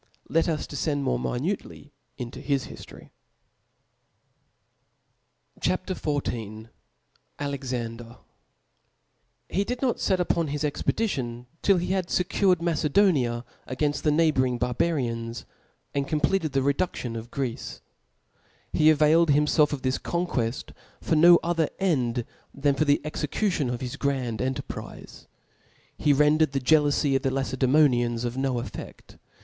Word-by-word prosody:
Let 165 Hz, +1 st, +2 dB
us 155 Hz, -2 st, -1 dB
defcend 145 Hz, 0 st, -2 dB
more 125 Hz, -2 st, 0 dB
mimnc 150 Hz, +11 st, -2 dB
ly 145 Hz, -, -14 dB, 0.3 s
into 125 Hz, +1 st, -7 dB
his 140 Hz, -2 st, 0 dB
hiftory. -, -, -12 dB, 2.5 s
C -, -, +1 dB
H -, -, +3 dB
A -, -, +2 dB
P. 185 Hz, -, -5 dB
XIV. 115 Hz, -, -4 dB, 0.7 s
Alexander. 125 Hz, -5 st, -4 dB, 1.3 s
TJ[E 195 Hz, -, +1 dB
did 245 Hz, 0 st, -3 dB
not 250 Hz, -3 st, +1 dB
iet -, -, -1 dB
out 185 Hz, -, +3 dB
upon 170 Hz, -2 st, +1 dB
his 145 Hz, +1 st, -3 dB
expedition 130 Hz, -, -2 dB, 0.2 s
till 195 Hz, -2 st, +4 dB
be 180 Hz, +1 st, -2 dB
bad 190 Hz, -2 st, 0 dB
fecured 180 Hz, -1 st, +1 dB
Macedonia 150 Hz, -7 st, +2 dB, 0.2 s
againft 145 Hz, +3 st, -1 dB
the 155 Hz, -, +2 dB
neighbouring 145 Hz, -5 st, +2 dB
barbarians, 120 Hz, -2 st, -1 dB, 0.5 s
and 140 Hz, -1 st, -1 dB
completed 155 Hz, +1 st, 0 dB
the 135 Hz, -, +2 dB
reduftion 140 Hz, -4 st, -1 dB
of 115 Hz, +1 st, -7 dB
Greece; 125 Hz, -3 st, -4 dB, 0.9 s
he 155 Hz, 0 st, +5 dB
availed 155 Hz, +2 st, +4 dB
himfelf 150 Hz, +1 st, +3 dB
of 145 Hz, -3 st, -4 dB
thb 130 Hz, 0 st, 0 dB
conqueft 135 Hz, -9 st, -2 dB, 0.3 s
for 160 Hz, -, 0 dB
no 170 Hz, +3 st, +8 dB
other 165 Hz, -2 st, +1 dB
end 125 Hz, -11 st, 0 dB, 0.3 s
than 140 Hz, 0 st, +2 dB
for 155 Hz, +3 st, +1 dB
the 145 Hz, 0 st, +3 dB
execution 150 Hz, -, -1 dB
of 125 Hz, +1 st, -3 dB
his 125 Hz, -2 st, -5 dB
grand 130 Hz, -5 st, -1 dB
enterprize, 130 Hz, +1 st, -6 dB, 0.7 s
heren 150 Hz, +1 st, +4 dB
dered 155 Hz, -3 st, +2 dB
the 135 Hz, -, +1 dB
jealoufy 145 Hz, 0 st, +3 dB
of 135 Hz, -, +2 dB
the 135 Hz, -, +1 dB
Lacedemonians 130 Hz, -2 st, +2 dB
of 120 Hz, 0 st, -3 dB
no 135 Hz, -1 st, 0 dB
eficA -, -, -9 dB
140 Hz, 135 wpm, -26 LUFS, 125-160 Hz, 2.5 s, no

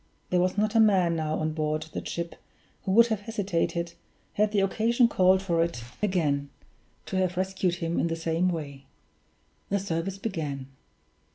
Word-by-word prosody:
There 180 Hz, -, +3 dB
was 180 Hz, +2 st, +1 dB
not 215 Hz, +1 st, +1 dB
a 225 Hz, -, +4 dB
man 190 Hz, -6 st, +4 dB
now 155 Hz, -1 st, -1 dB
on 155 Hz, 0 st, -1 dB
board 155 Hz, 0 st, -1 dB
the -, -, -4 dB
ship 170 Hz, 0 st, -4 dB, 0.5 s
who 190 Hz, -, 0 dB
would 235 Hz, +3 st, +8 dB
have 220 Hz, -2 st, 0 dB
hesitated, 185 Hz, -5 st, -2 dB, 0.4 s
had 210 Hz, 0 st, +2 dB
the 205 Hz, -2 st, +2 dB
occasion 230 Hz, +5 st, +3 dB
called 190 Hz, -3 st, +4 dB
for 170 Hz, -3 st, +2 dB
it 165 Hz, -9 st, -4 dB, 0.2 s
again, 150 Hz, -8 st, +1 dB, 0.6 s
to 190 Hz, -, -3 dB
have 185 Hz, -1 st, 0 dB
rescued 185 Hz, -1 st, 0 dB
him 170 Hz, -1 st, -2 dB
in -, -, +2 dB
the 165 Hz, -, -1 dB
same 165 Hz, +2 st, 0 dB
way. 140 Hz, -5 st, -5 dB, 0.8 s
The 200 Hz, -, +2 dB
service 190 Hz, 0 st, -2 dB
began. 150 Hz, -10 st, -4 dB
180 Hz, 170 wpm, -27 LUFS, 165-195 Hz, 0.8 s, would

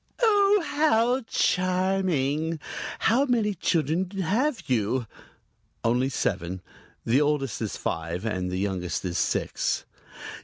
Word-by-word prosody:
"Oh, 410 Hz, -4 st, +4 dB
how 255 Hz, -4 st, +2 dB
charming! 180 Hz, -5 st, +1 dB, 0.4 s
How 245 Hz, +5 st, +3 dB
many 230 Hz, -5 st, +1 dB
children 165 Hz, +1 st, 0 dB
have 235 Hz, -, 0 dB
you?" 120 Hz, 0 st, 0 dB, 0.8 s
"Only 125 Hz, +3 st, +2 dB
seven. 90 Hz, -7 st, -2 dB, 0.4 s
The 125 Hz, +5 st, +3 dB
oldest 145 Hz, -5 st, 0 dB
is -, -, -3 dB
five 85 Hz, +5 st, -3 dB
and 95 Hz, -5 st, -1 dB
the 90 Hz, -, -2 dB
youngest 95 Hz, -2 st, -2 dB
is 85 Hz, -1 st, -1 dB
six." -, -, -1 dB
155 Hz, 110 wpm, -26 LUFS, -, 0.8 s, Oh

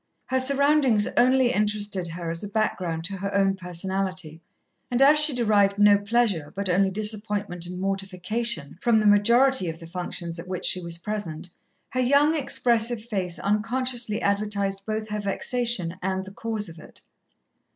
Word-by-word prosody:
Her 260 Hz, -, 0 dB
surroundings 275 Hz, -4 st, +3 dB
only 255 Hz, 0 st, +3 dB
interested 205 Hz, -3 st, 0 dB
her 170 Hz, 0 st, -5 dB
as 165 Hz, +3 st, -4 dB
a -, -, -4 dB
background 185 Hz, -6 st, -2 dB
to 195 Hz, +3 st, -2 dB
her 200 Hz, +1 st, -4 dB
own 195 Hz, -1 st, +2 dB
personality, 185 Hz, -2 st, -4 dB, 0.5 s
and 245 Hz, -, -1 dB
as 290 Hz, +3 st, +6 dB
she 300 Hz, 0 st, +7 dB
derived 205 Hz, -4 st, +2 dB
no 205 Hz, 0 st, +6 dB
pleasure, 205 Hz, -7 st, 0 dB
but 200 Hz, -1 st, -3 dB
only 190 Hz, +2 st, +2 dB
disappointment 205 Hz, -3 st, -1 dB
and 180 Hz, 0 st, -7 dB
mortification, 195 Hz, -2 st, -2 dB
from 235 Hz, -2 st, +3 dB
the 215 Hz, -, -1 dB
majority 235 Hz, +1 st, +4 dB
of 165 Hz, 0 st, -7 dB
the 165 Hz, -, -11 dB
functions 170 Hz, -1 st, -6 dB
at 175 Hz, -, -9 dB
which 185 Hz, -1 st, -4 dB
she 185 Hz, -, +4 dB
was 170 Hz, -1 st, -2 dB
present, 175 Hz, -3 st, -6 dB, 0.4 s
her 255 Hz, -, -3 dB
young, 285 Hz, +5 st, +3 dB
expressive 240 Hz, -5 st, +1 dB
face 190 Hz, -6 st, -3 dB
unconsciously 230 Hz, +2 st, -1 dB
advertised 200 Hz, -1 st, -1 dB
both 215 Hz, 0 st, -3 dB
her 210 Hz, 0 st, -3 dB
vexation 205 Hz, -3 st, -1 dB
and 190 Hz, +1 st, -2 dB
the 195 Hz, -, -10 dB
cause 220 Hz, 0 st, -4 dB
of 165 Hz, -1 st, -12 dB
it. -, -, -15 dB
205 Hz, 160 wpm, -24 LUFS, 185-235 Hz, 0.5 s, she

